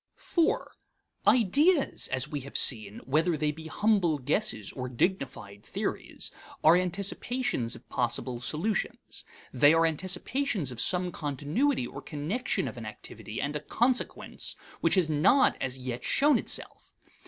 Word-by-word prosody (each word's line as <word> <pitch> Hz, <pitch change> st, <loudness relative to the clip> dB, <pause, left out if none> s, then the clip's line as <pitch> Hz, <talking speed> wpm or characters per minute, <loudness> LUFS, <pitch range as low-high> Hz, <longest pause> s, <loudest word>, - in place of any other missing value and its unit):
IV. 335 Hz, -3 st, +1 dB, 0.6 s
Ideas, 280 Hz, -, +3 dB
as 130 Hz, -, -1 dB
we 145 Hz, -, -4 dB
have 140 Hz, +1 st, -5 dB
seen, 110 Hz, -4 st, +3 dB
whether 155 Hz, +5 st, +2 dB
they 150 Hz, 0 st, +1 dB
be 160 Hz, +1 st, -9 dB
humble 195 Hz, -5 st, +2 dB
guesses 110 Hz, -5 st, -1 dB
or 125 Hz, -1 st, -5 dB
dignified 125 Hz, -, -2 dB
theories, -, -, -4 dB, 0.3 s
are 160 Hz, +2 st, +8 dB
anticipations 185 Hz, -, -1 dB
of -, -, -15 dB
possible 120 Hz, 0 st, -1 dB
solutions. 180 Hz, -, -2 dB, 0.3 s
They 145 Hz, +5 st, +6 dB
are 165 Hz, 0 st, +4 dB
anticipations 185 Hz, -, -1 dB
of 120 Hz, -2 st, -3 dB
some 180 Hz, -1 st, +4 dB
continuity 150 Hz, -, 0 dB
or -, -, -8 dB
connection 170 Hz, -, -2 dB
of -, -, -7 dB
an -, -, -7 dB
activity -, -, -7 dB
and -, -, -2 dB
a -, -, 0 dB
consequence 250 Hz, +1 st, -1 dB, 0.2 s
which -, -, +3 dB
has 180 Hz, -4 st, +3 dB
not 155 Hz, -, +4 dB
as 130 Hz, 0 st, -1 dB
yet 125 Hz, -1 st, -5 dB
shown 290 Hz, -2 st, +4 dB
itself. -, -, -5 dB
160 Hz, 140 wpm, -29 LUFS, 130-210 Hz, 0.6 s, are